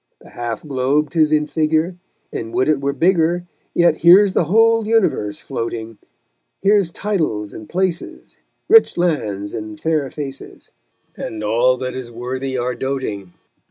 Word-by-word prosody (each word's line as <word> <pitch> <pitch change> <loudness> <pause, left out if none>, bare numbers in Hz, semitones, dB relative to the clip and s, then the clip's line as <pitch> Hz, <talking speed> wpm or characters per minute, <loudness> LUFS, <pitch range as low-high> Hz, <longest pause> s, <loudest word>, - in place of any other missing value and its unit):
The - - -17
half 120 -2 -5
globe 140 +1 0
'tis 155 -1 +2
in 150 -1 +3
figure, 160 +3 0 0.4
And 115 0 -5
would 130 - +2
it 150 -3 +2
were 140 0 0
bigger, 170 +3 +1 0.3
Yet 170 0 +4
here's 185 +3 +6
the - - +2
whole 225 +4 +3
universe 195 - +1
floating; 115 -1 -5 0.6
Here's 200 -2 +3
titles 160 - -2
and 110 - -10
places, 180 -2 -3 0.3
Rich 450 - +5
lands, 110 - -1
and 110 -2 -6
fair 155 -4 0
faces, 135 -2 -8 0.4
And 110 -1 -6
all 120 +4 +2
that 130 0 -4
is 130 -2 -6
worthy 130 +3 -4
our 125 +1 -1
doting. 115 -9 -4
140 Hz, 145 wpm, -19 LUFS, 120-170 Hz, 0.6 s, here's